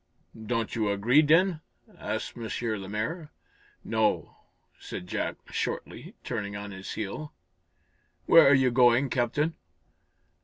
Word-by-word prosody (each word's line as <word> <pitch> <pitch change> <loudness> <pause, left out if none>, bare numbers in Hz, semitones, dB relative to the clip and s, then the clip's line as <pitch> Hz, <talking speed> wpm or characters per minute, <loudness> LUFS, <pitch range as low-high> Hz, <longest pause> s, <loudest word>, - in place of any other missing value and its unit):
"Don't 115 -2 -1
you 110 -3 0
agree, 110 +9 +4
then?" 165 +2 +3 0.3
asked - - -4
M. 115 -2 -6 0.3
Lemaire. 110 - -4 0.5
"No," 110 -1 0 0.4
said 90 - -7
Jack, - - -3 0.2
shortly, - - -4
turning 100 -1 -4
on 100 0 -6
his 95 0 -7
heel. 110 +9 -5 0.9
"Where 165 -4 +7
are 140 - +7
you 130 -1 +3
going, 125 +2 +4
Captain?" 145 +6 0
120 Hz, 115 wpm, -28 LUFS, 105-150 Hz, 0.9 s, Where